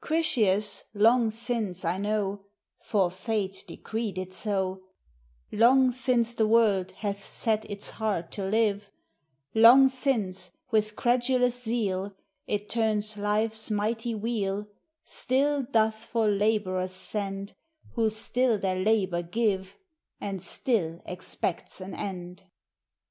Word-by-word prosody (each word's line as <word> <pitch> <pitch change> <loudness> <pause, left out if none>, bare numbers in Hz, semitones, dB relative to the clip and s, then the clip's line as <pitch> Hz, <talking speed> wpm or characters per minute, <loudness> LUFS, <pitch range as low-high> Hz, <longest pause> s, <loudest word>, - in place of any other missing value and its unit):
Critias, 215 -11 +1
long 230 +2 +4
since, 220 -5 -3
I 175 +3 0
know 205 -1 -1 0.3
(For 195 -5 +1
Fate 195 0 -3
decreed 220 -4 -4
it 185 0 -5
so), 190 -2 -1 0.7
Long 255 +3 +5
since 240 -2 +1
the 220 -2 +1
world 215 -5 +3
hath 200 -2 -4
set 220 -1 -1
its 205 0 -2
heart 205 -7 -2
to 200 - -5
live; 205 0 +1 0.6
Long 245 +4 +8
since, 245 -8 -2 0.2
with 215 -1 +1
credulous 245 +1 +1
zeal 205 -5 -2 0.3
It 210 0 -2
turns 215 -2 0
life's 215 +2 +1
mighty 225 +2 -1
wheel, 210 -2 -2 0.4
Still 280 +3 +1
doth 220 -3 +1
for 230 -2 0
laborers 200 -3 +1
send 195 +1 -4 0.4
Who 225 -2 +1
still 230 +2 +1
their 185 -2 -1
labor 190 -3 +1
give, 190 +1 -1 0.4
And 195 -2 -4
still 170 -10 -1
expects 180 0 -4
an 190 0 -7
end. 180 -1 -6
210 Hz, 115 wpm, -27 LUFS, 195-230 Hz, 0.7 s, Long